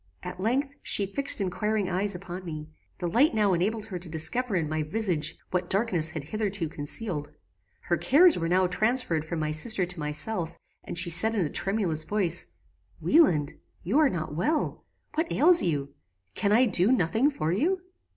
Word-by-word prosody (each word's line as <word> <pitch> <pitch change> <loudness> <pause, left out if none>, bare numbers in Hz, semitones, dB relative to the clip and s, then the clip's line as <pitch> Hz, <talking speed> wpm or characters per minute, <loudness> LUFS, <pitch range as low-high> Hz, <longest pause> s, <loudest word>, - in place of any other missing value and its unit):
"At 180 0 -7
length, 265 +8 -1
she 200 - 0
fixed 280 +8 +1
inquiring 200 +2 -1
eyes 190 +2 -2
upon 180 +1 -8
me. 155 -3 -7 0.3
The 175 - -3
light 240 - +2
now 205 -3 +2
enabled 210 +5 -1
her 190 -5 -6
to 175 -1 -10
discover 195 +9 +1
in 165 -4 0
my 155 +1 -2
visage 160 -2 -1
what 180 -1 -2
darkness 190 -6 +3
had 160 -2 -6
hitherto 200 -1 -3
concealed. 150 +1 -3 0.5
Her 175 - -1
cares 335 +5 +5
were 165 -1 -2
now 185 +1 +3
transferred 215 -2 0
from 165 +2 -5
my 155 -1 -2
sister 185 +5 +4
to 180 -1 -4
myself, 160 +4 -1 0.3
and - - -7
she 170 0 +2
said 220 +7 +4
in 190 -6 +1
a - - -3
tremulous 190 -6 -1
voice, 185 -3 -1 0.5
"Wieland! 165 - +3 0.3
you 215 - +1
are 305 -3 +4
not 160 - -4
well: 295 - -1 0.3
What 325 +2 -2
ails 345 +3 +5
you? 140 -4 -2 0.4
Can 205 - 0
I 240 +5 +5
do 195 0 +3
nothing 225 - +2
for 160 - -3
you?" 345 - 0
185 Hz, 180 wpm, -27 LUFS, 165-225 Hz, 0.5 s, cares